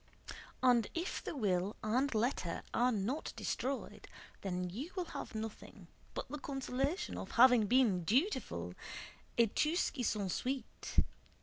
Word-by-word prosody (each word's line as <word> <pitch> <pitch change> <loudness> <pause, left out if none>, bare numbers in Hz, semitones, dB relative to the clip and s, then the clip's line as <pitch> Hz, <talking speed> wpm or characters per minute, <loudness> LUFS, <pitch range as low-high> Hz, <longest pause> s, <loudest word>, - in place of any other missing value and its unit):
And 245 -4 +5
if 340 +2 -2
the - - -4
will 195 -3 +1
and 245 +4 +1
letter 215 -7 0
are 245 +2 +4
not 230 +7 -1
destroyed, 270 +2 -3 0.3
then 180 -2 -2
you 240 - -5
will 365 -2 -1
have 225 - -6
nothing 215 -4 -7 0.3
but - - -3
the 295 +3 -5
consolation 275 +7 -2
of - - -6
having 245 -3 +7
been 225 -7 +4
dutiful 270 - +1 0.6
et 230 -2 +4
tout 310 +3 +2
ce - - +2
qui 260 - -4
s'ensuit! 230 +4 0
245 Hz, 135 wpm, -35 LUFS, 210-275 Hz, 0.6 s, having